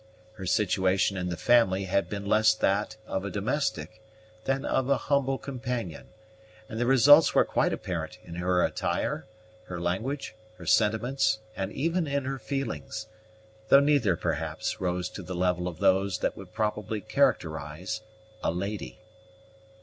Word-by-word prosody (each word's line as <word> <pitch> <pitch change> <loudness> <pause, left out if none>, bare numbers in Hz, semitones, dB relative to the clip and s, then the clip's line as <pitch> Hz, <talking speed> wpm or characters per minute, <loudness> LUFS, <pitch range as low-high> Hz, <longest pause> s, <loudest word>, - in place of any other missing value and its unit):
Her 95 -4 -7
situation 95 -1 +2
in 90 -1 -2
the 85 - -3
family 115 -6 +3
had 95 -1 0
been 100 0 -4
less 110 +1 +4
that 105 +2 0
of 95 - -3
a 100 - -3
domestic 110 0 -2 0.4
than 135 0 0
of 130 0 0
a 140 - +4
humble 135 +1 +1
companion, 125 - -5 0.6
and 110 - -6
the 120 - +1
results 145 +4 +7
were - - +5
quite - - +1
apparent - - -4
in 85 - -10
her 90 0 +2
attire, - - -2 0.4
her 90 -4 -6
language, 110 +11 -2 0.2
her - - -10
sentiments, 110 +1 +2 0.2
and 95 +1 -3
even 165 +6 0
in 140 -1 -1
her 135 0 -3
feelings, 115 - -4 0.6
though 140 - +9
neither, 140 -10 +3
perhaps, 80 -2 -3
rose 90 -1 -1
to - - -8
the 90 0 -6
level 90 0 0
of 85 -3 -5
those 95 0 +2
which - - -1
would 95 -2 -11
properly 105 0 -2
characterize 80 +5 -1 0.4
a - - +2
lady. 100 +5 -5
105 Hz, 150 wpm, -28 LUFS, 90-125 Hz, 0.6 s, though